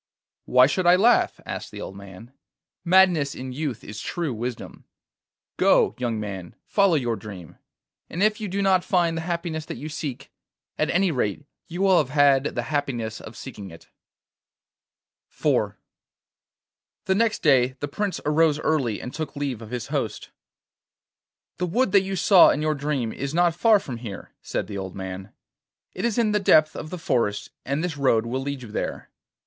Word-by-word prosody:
'Why 125 0 +6
should 175 +6 0
I 175 - +8
laugh?' 225 +6 +3
asked - - -5
the - - -9
old 95 - -7
man. 100 +5 -12 0.5
'Madness 175 -6 +4
in 130 0 -6
youth 135 -5 -4
is 105 +1 -8
true 165 -6 -3
wisdom. 120 +2 -6 0.7
Go, - - +4
young 120 -3 -1
man, 95 -4 -6
follow 200 -4 +3
your 120 -6 0
dream, 100 -7 -10 0.5
and 180 - -1
if 215 0 +2
you 210 - -2
do 200 +1 -2
not 190 -2 +3
find 175 -3 +1
the 165 - -2
happiness 170 -1 -3
that - - -7
you 155 - -6
seek, 140 -4 -6 0.4
at - - 0
any 185 0 +2
rate 125 0 -2 0.2
you 180 +2 -3
will 190 -2 +5
have 140 - 0
had 140 -1 +4
the 120 - -1
happiness 120 -5 -3
of 110 - -11
seeking 105 -7 -8
it.' 85 -1 -15 1.4
IV - - 0 1.3
The 190 - +2
next 220 +1 +1
day 130 -4 +4
the 145 - -3
Prince 200 +6 -3
arose 150 0 +3
early 130 -9 0
and 125 - -7
took 155 0 -5
leave 140 -5 -3
of 110 - -9
his 125 -1 -5
host. - - -3 1.3
'The 180 - -1
wood 235 +5 +1
that 200 - +6
you 195 0 -3
saw 190 0 +7
in 150 - 0
your 155 0 +1
dream 140 -6 -2
is 140 +3 -4
not 175 -1 +3
far 215 +4 +4
from 130 -11 -7
here,' 115 -4 -8
said - - -3
the 100 -1 -6
old 95 -1 -6
man. 95 +1 -7 0.6
'It - - -5
is 235 -1 0
in 225 -3 +2
the 210 - +2
depth 155 -5 +4
of 155 - -6
the 180 - -5
forest, 115 -10 -1
and 140 +4 -1
this 170 -4 -3
road 115 -5 +2
will 130 +3 -2
lead 140 -1 -4
you 110 - -10
there. - - -4
145 Hz, 180 wpm, -24 LUFS, 120-175 Hz, 1.4 s, I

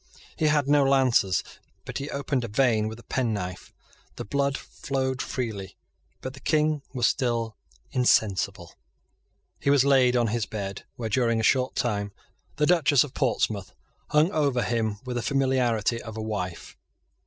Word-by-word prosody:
He 155 - +1
had 150 -2 +2
no 145 0 +5
lances; 130 -8 +3 0.4
but - - -5
he 140 +2 -5
opened 140 -2 -2
a - - -3
vein 110 -1 +2
with 110 0 -6
a 120 - -14
penknife. 105 -8 -3 0.4
The - - -6
blood 140 +4 0
flowed 130 -1 -3
freely; 110 -7 -4 0.4
but 130 - -5
the 135 - -12
King 155 +1 +1
was 125 -4 0
still 115 -4 0 0.4
insensible. 110 -6 +1 0.9
He - - 0
was 140 -1 +5
laid 130 -3 +4
on 120 -2 +2
his 115 -1 -1
bed, 100 -2 -5
where, 120 -4 -4
during 115 0 +2
a - - -1
short 130 +3 +2
time, 105 -5 -1 0.4
the 150 - +2
Duchess 150 -5 +4
of 145 -3 -9
Portsmouth 110 -8 -1 0.3
hung 155 +4 +3
over 140 -7 +1
him 110 -2 -1
with 125 -1 -3
the - - -1
familiarity 125 -4 +1
of 110 -1 -8
a 110 - -3
wife. 95 -5 -5
125 Hz, 160 wpm, -26 LUFS, 110-140 Hz, 0.9 s, no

